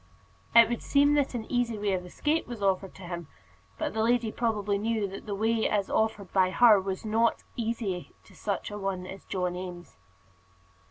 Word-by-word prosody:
It 230 -1 +9
would 240 0 -3
seem 285 +1 +4
that 285 -3 +1
an 225 -2 -3
easy 245 -3 0
way 205 -1 0
of 180 -1 -1
escape 300 - -1
was 235 -4 -6
offered 195 -1 0
to 190 - -11
him; 170 -2 -6 0.5
but 310 -2 -2
the 220 - 0
lady 230 0 +2
probably 210 -4 0
knew 220 -1 0
that 195 +3 -9
the 205 - -2
way 220 +2 +1
as 205 -2 0
offered 220 -3 0
by 185 -1 +4
her 215 0 +6
was 190 +2 -4
not 225 +2 +1
easy 220 -6 -3
to - - -19
such 200 0 -3
an 205 0 -6
one 190 -2 -2
as 190 +1 -9
John 180 -2 -2
Eames. 180 - -8
210 Hz, 195 wpm, -28 LUFS, 190-230 Hz, 0.5 s, It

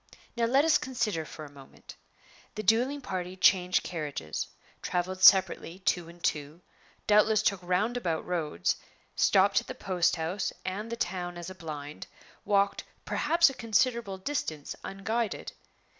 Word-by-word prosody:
Now 235 -1 +1
let 270 +6 +3
us 320 -2 +4
consider 225 -11 -2
for 155 0 -9
a 145 - -13
moment. 135 -2 -14 0.6
The 215 - -4
dueling 245 +8 +2
party 185 -5 -4
changed 185 -1 +4
carriages; 145 - -4 0.3
traveled 185 +1 -2
separately, 185 -2 +5
two 175 -3 -1
and 170 0 -15
two; 150 +3 -2 0.4
doubtless 210 0 +4
took 200 -2 +1
roundabout 180 -1 -1
roads; 155 - -1 0.4
stopped 195 +1 +4
at - - -17
the - - -6
post 180 -3 +1
house 175 +4 -2
and 210 +5 -4
the - - -1
town 175 -4 -3
as 175 +2 -7
a - - -7
blind; 150 -3 -7 0.4
walked, 200 -1 +2 0.2
perhaps, 335 -1 +3
a - - -10
considerable 230 -3 0
distance 185 - -4
unguided. 220 +3 -3
185 Hz, 145 wpm, -29 LUFS, 170-220 Hz, 0.6 s, separately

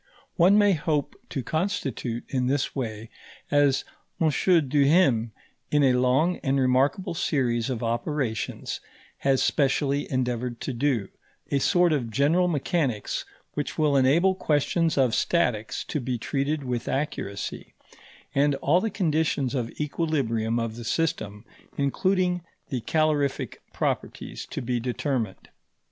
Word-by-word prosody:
One 185 +4 +5
may 205 -1 +5
hope 150 0 -1
to 135 - -3
constitute 135 - -2
in 125 -2 -1
this 135 +1 0
way, 110 -4 -4 0.4
as 145 -2 +3 0.3
M. 160 - +3 0.4
Duhem 140 -5 +3 0.4
in 150 -1 +3
a 130 -2 +5
long 130 +8 +2
and 135 0 0
remarkable 135 +8 +2
series 125 -8 0
of 125 -3 -3
operations 120 0 -2 0.4
has 135 -1 +2
specially 140 0 +1
endeavoured 125 -2 -1
to 135 - -3
do, 120 -5 0 0.4
a 140 - +2
sort 175 +3 +3
of 125 -6 -1
general 150 +10 +3
mechanics 145 - -1 0.3
which 145 - -3
will 150 -3 +3
enable 150 +8 +4
questions 160 -1 +1
of 130 -4 +3
statics 115 -8 0
to 150 - -3
be 125 -1 -2
treated 140 +5 -1
with 125 -2 -3
accuracy, 115 -8 -4 0.6
and 145 0 +3
all 155 +6 +2
the 225 - 0
conditions 160 - 0
of 120 -4 -1
equilibrium 135 -8 0
of 115 -1 -2
the 120 - -7
system, 110 -6 -2 0.3
including 180 +5 +1 0.3
the 130 -3 -2
calorific 150 +1 0
properties, - - -3
to - - -5
be 125 0 -1
determined. 120 -3 -3
140 Hz, 130 wpm, -26 LUFS, 120-155 Hz, 0.6 s, One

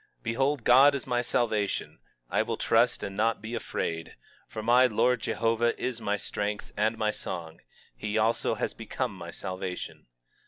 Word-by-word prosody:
22:2 - - -38
Behold, 135 +3 0
God 135 +5 +7
is 140 - -4
my 120 -1 +1
salvation; 110 -4 -1 0.3
I - - +1
will - - -2
trust, - - +2
and 95 - -4
not 110 +2 +1
be 110 +3 -7
afraid; 80 -7 -3 0.3
for 110 - -6
the 125 +3 +6
Lord 125 +2 +2
JEHOVAH 115 +1 +1
is 125 -2 -3
my 105 -1 0
strength 105 +1 -4
and 110 +2 +1
my 110 -1 +1
song; 85 -5 -6 0.4
he 105 - -2
also 110 +2 +2
has - - -2
become - - -3
my - - -8
salvation. 95 -1 -6
110 Hz, 165 wpm, -28 LUFS, 105-120 Hz, 0.4 s, God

